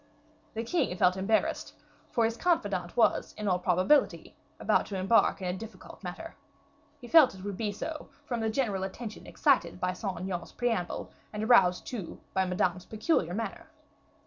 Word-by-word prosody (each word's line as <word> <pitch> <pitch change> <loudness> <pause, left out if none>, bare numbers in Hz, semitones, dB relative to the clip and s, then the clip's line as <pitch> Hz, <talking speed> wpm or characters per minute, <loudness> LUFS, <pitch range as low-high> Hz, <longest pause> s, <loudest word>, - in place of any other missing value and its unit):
The 225 - -2
king 235 - 0
felt 180 0 +4
embarrassed, 195 +4 0 0.4
for 230 - +2
his 225 0 0
confidant 205 - 0
was, 235 - +2
in 210 -1 -3
all 180 -2 +2
probability, 185 - +2 0.2
about - - +2
to 200 - -4
embark 195 0 +3
in - - -1
a 180 - -1
difficult 210 -1 -10
matter. 190 - -7 0.6
He 245 - -10
felt 305 -2 +7
that 190 - -11
it - - -9
would 200 -1 -3
be 210 +1 -2
so, 305 +9 -6 0.2
from 240 -2 -2
the 225 0 0
general 220 -5 0
attention 215 +3 -7
excited 275 -10 +2
by 180 0 0
Saint 185 -2 -4
Aignan's 180 -3 -4
preamble, 230 -8 -2 0.2
and 210 0 -4
aroused 195 -6 +5
too 215 -9 -6
by 190 0 +2
Madame's 180 0 0
peculiar 215 - 0
manner. 220 -2 -5
205 Hz, 170 wpm, -29 LUFS, 185-235 Hz, 0.6 s, felt